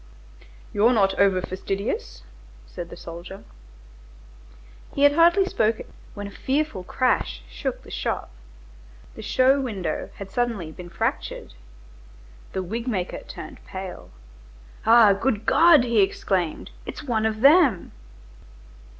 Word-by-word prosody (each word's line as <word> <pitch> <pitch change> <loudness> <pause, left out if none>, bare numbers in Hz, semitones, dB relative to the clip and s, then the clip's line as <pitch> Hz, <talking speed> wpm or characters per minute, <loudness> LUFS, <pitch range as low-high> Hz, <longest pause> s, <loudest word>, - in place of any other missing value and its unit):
"You're 225 +5 +4
not 195 -4 +3
over 195 -2 +3
fastidious," 185 - -4 0.4
said 170 - -8
the 170 - -10
soldier. 175 +4 -9 1.5
He 280 - +1
had 285 - +7
hardly 345 +5 +5
spoken 225 - -1 0.2
when 205 -1 -6
a 200 - -7
fearful 270 -3 -2
crash 180 - 0
shook - - -5
the - - -13
shop. - - -3 0.8
The - - -9
show 260 +5 +3
window 195 -11 -3
had 195 -1 -9
suddenly 230 -10 -2
been 175 +2 -10
fractured. 170 - -3 1.0
The 190 - -2
wig 230 +7 -5
maker 190 -7 -2
turned - - -10
pale. 190 -1 -7 0.8
"Ah, 225 -3 +7
good 215 +1 -1
God!" 320 +2 +6
he 235 -3 +3
exclaimed, 190 -3 -1
"it's - - -7
one 225 -5 0
of 215 0 -4
them!" 280 - +5
210 Hz, 125 wpm, -24 LUFS, 185-255 Hz, 1.5 s, had